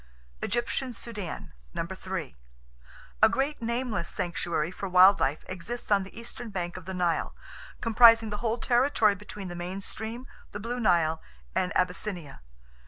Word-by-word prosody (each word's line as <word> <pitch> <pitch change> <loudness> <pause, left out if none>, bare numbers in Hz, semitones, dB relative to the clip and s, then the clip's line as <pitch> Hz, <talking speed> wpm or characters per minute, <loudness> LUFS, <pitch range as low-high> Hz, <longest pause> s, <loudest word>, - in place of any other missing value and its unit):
Egyptian 245 +2 -1
Sudan: 210 - -6 0.2
3. 185 - -4 0.9
A - - +8
great 275 +1 -1
nameless 235 -6 -1
sanctuary 170 -2 -1
for 195 +1 -5
wild 185 +2 +7
life 140 +3 0
exists 205 +6 -5
on 200 -1 +5
the 195 +4 -9
eastern 235 0 -7
bank 175 -4 -3
of 185 -1 -8
the 190 - -5
Nile, 175 -2 0 0.5
comprising 230 -1 +6
the 210 - -2
whole 230 +1 -1
territory 240 -3 +3
between 200 0 -8
the 175 - -6
main 180 +2 -4
stream, 220 +5 -5 0.3
the 205 - -4
Blue 240 +4 -3
Nile 170 -7 +3 0.3
and 180 - 0
Abyssinia. 180 - -2
200 Hz, 145 wpm, -28 LUFS, 180-230 Hz, 0.9 s, A